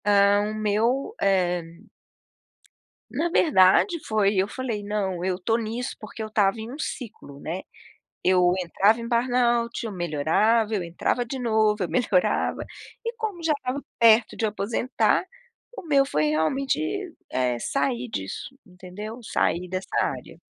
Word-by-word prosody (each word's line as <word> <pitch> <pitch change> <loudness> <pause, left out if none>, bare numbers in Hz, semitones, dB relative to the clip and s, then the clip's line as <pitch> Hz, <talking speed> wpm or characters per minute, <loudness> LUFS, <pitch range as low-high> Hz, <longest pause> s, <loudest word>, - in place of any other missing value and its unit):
Ah, 200 0 +4
o - - -4
meu, 225 - 0
eh 175 -3 0 1.3
na 345 - -1
verdade, 315 - +4
foi, 210 -2 +2
eu 190 +1 +2
falei: 230 -2 -4
"Não, 195 -4 -2
eu 185 -1 0
estou 200 +5 0
nisso, 230 +2 -4
porque 215 +1 -9
eu - - -4
estava 210 -1 +1
em 220 +2 -6
um 275 - -7
ciclo", 225 - -7
né. 170 +6 -4 0.6
Eu 180 -1 +4
entrava 195 +5 +2
em 235 - -5
burnout, 240 -1 +1
eu 220 - -5
melhorava, 185 +7 +1
eu 200 - 0
entrava 175 +8 -1
de 260 +3 -5
novo, 220 -3 +2
eu 180 - -1
melhorava, 205 -8 +1 0.4
e 465 +1 -3
como 430 -6 -4
já 325 -1 +2
estava 260 0 -4 0.2
perto 230 -1 +5
de - - -2
aposentar, 215 +4 0 0.5
o - - -6
meu 285 -5 +3
foi, 155 - 0
realmente, 160 - +1 0.5
eh, 125 -2 0
sair 250 - -1
disso, 95 - -5
entendeu? 190 +6 -9
Sair 180 -4 0
dessa 185 +1 -4
área. - - -4
215 Hz, 145 wpm, -25 LUFS, 185-245 Hz, 1.3 s, perto